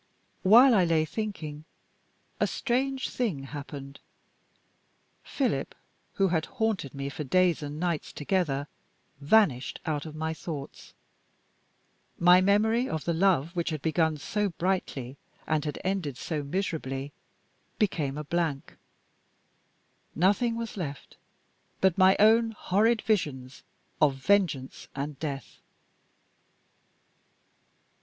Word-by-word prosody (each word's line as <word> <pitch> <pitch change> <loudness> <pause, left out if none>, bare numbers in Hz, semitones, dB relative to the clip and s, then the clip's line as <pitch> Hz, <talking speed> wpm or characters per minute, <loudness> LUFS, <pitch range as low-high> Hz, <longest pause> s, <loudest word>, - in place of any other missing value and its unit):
While 240 +7 +7
I 195 -5 +5
lay 165 -2 +2
thinking, 160 -7 -5 0.8
a - - +2
strange 265 +1 -1
thing 195 - -2
happened. 140 0 -8 1.2
Philip, - - -2 0.4
who 195 -1 +2
had 160 -2 0
haunted 210 - -1
me 140 0 -4
for 145 +2 -5
days 175 +4 +2
and 145 +1 -6
nights 170 -3 -2
together, 145 -4 -1 0.5
vanished 145 - +2
out 155 -2 -2
of 155 - -9
my 160 +1 -2
thoughts. 155 -3 -8 1.2
My 180 +1 +6
memory 220 +6 +2
of 160 - -3
the 170 - +1
love 170 -2 +2
which 170 -1 -1
had 155 -3 -4
begun 160 -1 +1
so 205 +8 -1
brightly, 165 -8 -2 0.3
and 155 -1 0
had 150 - -3
ended 180 -9 -2
so 155 -3 -3
miserably, 145 -4 -3 0.7
became 150 - 0
a 150 - -4
blank. 155 -3 -2 1.4
Nothing 205 +7 +2
was 230 -2 -5
left 145 -7 -6 0.6
but 190 -3 +3
my 190 0 +6
own 225 +2 +5
horrid 220 +4 +2
visions 140 - -1 0.4
of 145 -3 +4
vengeance 150 -4 0
and 140 0 -4
death. 140 -4 -5
165 Hz, 115 wpm, -28 LUFS, 145-195 Hz, 1.4 s, While